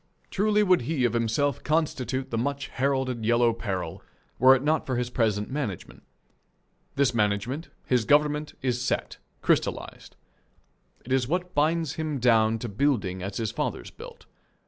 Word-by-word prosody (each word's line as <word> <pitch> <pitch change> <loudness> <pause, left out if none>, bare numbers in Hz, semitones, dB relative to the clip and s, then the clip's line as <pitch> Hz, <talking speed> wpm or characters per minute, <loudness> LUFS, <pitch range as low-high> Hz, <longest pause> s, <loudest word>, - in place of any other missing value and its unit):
Truly 210 +1 +2
would 185 -6 +4
he 140 -6 +1
of 120 - +1
himself 120 +4 0
constitute 140 -4 -1
the - - -1
much 140 +2 -2
heralded 130 -3 -1
Yellow 120 +1 +3
Peril 95 -5 -4 0.4
were 130 +2 +8
it 130 - -2
not 155 +2 +1
for 130 - -1
his 120 0 -2
present 110 -2 0
management. 130 - -5 0.9
This 140 -3 +2
management, 110 - -1 0.2
his 125 -3 +2
government, 150 +3 +2
is 125 -2 0
set, 125 - -2 0.3
crystallized. - - -1 0.9
It 125 - -8
is 130 -2 +2
what 180 +4 -2
binds 155 +1 +1
him 155 -2 -2
down 115 -3 +3
to 120 - -5
building 105 -5 0
as 95 +1 -5
his 110 -2 -2
fathers - - -4
built. - - -12
130 Hz, 150 wpm, -26 LUFS, 115-145 Hz, 0.9 s, were